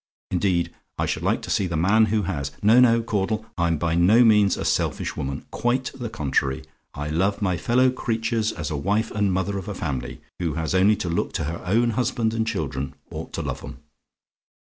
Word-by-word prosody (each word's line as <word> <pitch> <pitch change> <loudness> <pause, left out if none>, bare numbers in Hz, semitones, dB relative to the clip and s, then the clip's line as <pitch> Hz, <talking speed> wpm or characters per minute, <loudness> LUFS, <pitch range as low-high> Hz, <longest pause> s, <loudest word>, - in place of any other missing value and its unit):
Indeed, 90 -2 +1 0.2
I - - 0
should - - -2
like - - 0
to - - -5
see 95 - +1
the 85 -2 -2
man 100 +7 +4
who 110 0 0
has! 70 -8 -2
No, 110 +4 +6
no, 115 -2 +5
Caudle; 110 0 -1
I'm 85 -2 +1
by 80 +1 0
no 95 +8 +5
means 105 -3 +4
a - - -4
selfish - - 0
woman 70 0 -4
quite 125 +2 0
the 120 -3 -5
contrary; 70 -7 -1 0.3
I 75 +1 -4
love 95 +6 +1
my 95 -4 +1
fellow 125 +8 +3
creatures 115 -2 -1
as 75 -5 -5
a - - -1
wife 105 +9 0
and 105 -2 +1
mother 95 +2 -1
of 95 - -9
a 105 - -4
family, 65 -9 -4 0.2
who 85 -4 -1
has 80 0 -2
only 95 +3 +5
to 95 - -4
look 85 0 -1
to - - -2
her 80 +3 -4
own 115 +5 +3
husband 115 -1 0
and 115 0 -1
children, 70 -10 -3 0.2
ought - - -6
to - - -3
love - - -4
'em. - - -8
100 Hz, 205 wpm, -24 LUFS, 85-110 Hz, 0.3 s, No